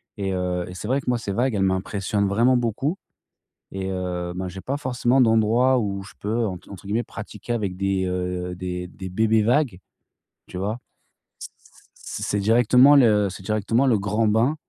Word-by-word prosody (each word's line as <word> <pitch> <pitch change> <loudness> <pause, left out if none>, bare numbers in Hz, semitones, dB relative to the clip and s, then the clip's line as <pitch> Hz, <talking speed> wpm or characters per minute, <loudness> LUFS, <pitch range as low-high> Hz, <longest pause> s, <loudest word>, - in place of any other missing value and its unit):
et 100 -2 -2
heu, 90 -1 -1
et - - -8
c'est 100 +3 -6
vrai 135 +2 +1
que, - - -4
moi, 120 - +2
ces 100 -3 -4
vagues, 125 +2 +1
elles 100 -2 +1
m'impressionnent 100 +1 0
vraiment 120 +5 +3
beaucoup, 125 - -1 0.7
et 95 0 -4
heu, 90 -1 -3
ben, 95 0 -3
j'ai 95 +1 -8
pas 140 +7 -3
forcément 130 -1 +1
d'endroit 115 +3 +3
où 100 -4 -2
je 95 - -12
peux 110 +2 -1
entre 95 0 -8
entre 95 0 -11
guillemets 115 +4 0
«pratiquer» 110 +1 -7
avec 100 -5 -2
des, 95 -1 0
heu, 90 0 -3
des 90 0 -5
des 95 +1 -8
bébés 110 +2 +2
vagues, 125 - +2 0.7
tu 90 - -8
vois? 105 +5 -2 0.6
C - - -7
c - - -25 0.2
c'est - - -7
c'est 105 - -1
directement 125 +6 +5
le 105 -7 +4
c'est 95 0 -9
directement 110 +5 +1
le 110 -5 +3
grand 105 +2 0
bain, 115 +8 +2
105 Hz, 190 wpm, -23 LUFS, 95-120 Hz, 0.7 s, directement